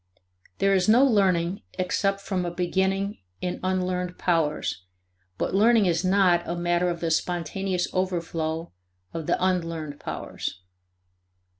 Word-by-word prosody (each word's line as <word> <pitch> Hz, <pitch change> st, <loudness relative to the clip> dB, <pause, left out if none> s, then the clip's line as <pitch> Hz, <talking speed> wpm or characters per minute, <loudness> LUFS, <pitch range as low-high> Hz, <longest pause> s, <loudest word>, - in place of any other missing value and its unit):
There 195 Hz, 0 st, +3 dB
is 185 Hz, +1 st, +2 dB
no 245 Hz, +5 st, +7 dB
learning 190 Hz, -6 st, +2 dB, 0.2 s
except 195 Hz, +2 st, 0 dB
from 190 Hz, -2 st, -2 dB
a 175 Hz, -, -1 dB
beginning 190 Hz, +3 st, 0 dB, 0.2 s
in 180 Hz, -1 st, -3 dB
unlearned 180 Hz, -1 st, -1 dB
powers, 150 Hz, -, 0 dB, 0.5 s
but -, -, -1 dB
learning 220 Hz, +2 st, +5 dB
is 170 Hz, -1 st, +1 dB
not 185 Hz, -2 st, +4 dB
a 170 Hz, -, -2 dB
matter 175 Hz, +1 st, +1 dB
of 170 Hz, -1 st, -3 dB
the 165 Hz, -1 st, 0 dB
spontaneous 180 Hz, +2 st, -1 dB
overflow 170 Hz, -3 st, -2 dB, 0.4 s
of 160 Hz, -2 st, -5 dB
the -, -, +2 dB
unlearned 165 Hz, -5 st, -2 dB
powers. 95 Hz, -, -5 dB
180 Hz, 130 wpm, -26 LUFS, 170-190 Hz, 0.5 s, no